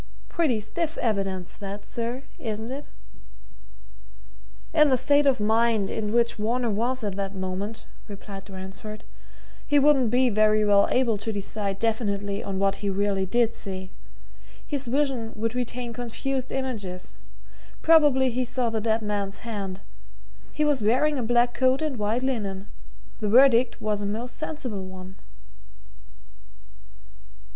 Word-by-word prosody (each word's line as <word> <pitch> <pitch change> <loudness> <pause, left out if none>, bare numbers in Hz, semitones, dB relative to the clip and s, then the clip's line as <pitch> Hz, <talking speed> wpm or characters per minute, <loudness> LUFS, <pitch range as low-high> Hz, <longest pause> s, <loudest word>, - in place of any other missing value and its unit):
Pretty 290 -10 +1
stiff 315 +10 -3
evidence 195 -5 -1
that, 200 0 -7
sir, 240 +3 -4 0.2
isn't 220 +1 -4
it?" 280 +2 -5 1.9
"In 305 -1 +6
the 260 -2 +3
state 285 +3 +3
of 265 -4 +3
mind 220 -1 +2
in 210 -2 -2
which 235 0 +2
Varner 235 +2 0
was 240 +4 0
at 200 -3 -2
that 195 0 -3
moment," 190 +4 -4 0.2
replied 200 -1 -9
Ransford, 195 +3 -8 0.6
"he 290 - +4
wouldn't 280 -4 +5
be 250 +3 +3
very 215 0 +4
well 200 -1 +5
able 240 -4 +2
to 205 +2 -3
decide 200 -1 -2
definitely 205 -3 -1
on 195 -1 -3
what 195 0 +1
he 205 - -2
really 195 -1 0
did 235 +2 +2
see. 190 -1 -6 0.7
His 280 -3 -1
vision 260 -3 0
would 225 +1 -2
retain 245 -1 -3
confused 250 +2 -3
images. 205 -9 -4 0.7
Probably 290 -5 +5
he 255 +2 0
saw 245 -1 -1
the 220 -1 -1
dead 220 0 +1
man's 205 0 -3
hand 200 -4 -4 0.7
he 300 - 0
was 290 -4 +2
wearing 260 +7 +2
a - - 0
black 240 +1 +2
coat 260 0 +3
and 300 -5 -2
white 215 +4 0
linen. 205 -7 -2 0.5
The 210 - -1
verdict 250 +1 +5
was 210 -1 -1
a 200 - -2
most 235 +4 -4
sensible 280 - -4
one." 185 0 -10
225 Hz, 140 wpm, -26 LUFS, 200-255 Hz, 1.9 s, In